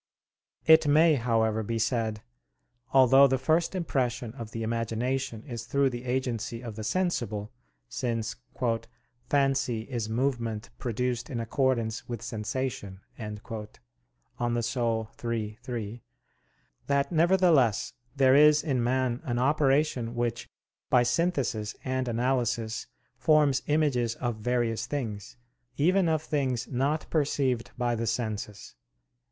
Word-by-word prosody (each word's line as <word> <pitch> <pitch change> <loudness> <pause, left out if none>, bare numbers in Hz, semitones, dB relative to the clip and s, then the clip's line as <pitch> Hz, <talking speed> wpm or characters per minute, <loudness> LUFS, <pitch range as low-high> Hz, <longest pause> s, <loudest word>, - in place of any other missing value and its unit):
It 160 -1 +7
may, 155 +3 +6
however, 115 -4 +1
be 115 +2 -2
said, 110 -1 -1 0.7
although 135 +1 +7
the 130 0 +1
first 160 +7 +1
impression 125 -9 -1
of 115 -4 -7
the 115 0 -5
imagination 115 +2 -2
is 120 -5 -6
through 140 +1 +2
the 120 +1 -6
agency 120 -2 -2
of 115 -3 -6
the 110 - -6
sensible, 110 - -1 0.4
since 115 - -2 0.9
"fancy 135 -5 +1
is 115 -2 -4
movement 115 -3 -2
produced 125 +1 -2
in 125 -5 -3
accordance 115 -1 -1
with 120 -2 -5
sensation" 115 -3 -4
(De - - -12 1.1
Anima 120 -1 -1 0.5
iii, 115 -3 -3
3), 120 -3 -5 0.8
that 140 +2 +1
nevertheless 165 - +3 0.2
there 135 -1 +5
is 150 +1 +6
in 135 -6 0
man 125 0 0
an 120 -2 -2
operation 135 -3 +2
which 120 -1 -2 0.4
by 125 - +5
synthesis 125 -6 0
and 130 -1 -1
analysis 120 -2 -1 0.3
forms 150 -4 +3
images 135 -7 +1
of 120 -3 -3
various 115 0 -1
things, 115 -8 -5 0.4
even 180 +4 +3
of 155 -1 +1
things 130 -6 -1
not 140 +4 0
perceived 140 -6 0
by 120 -1 0
the 115 0 -2
senses. 110 -3 -3
125 Hz, 120 wpm, -28 LUFS, 115-140 Hz, 1.1 s, It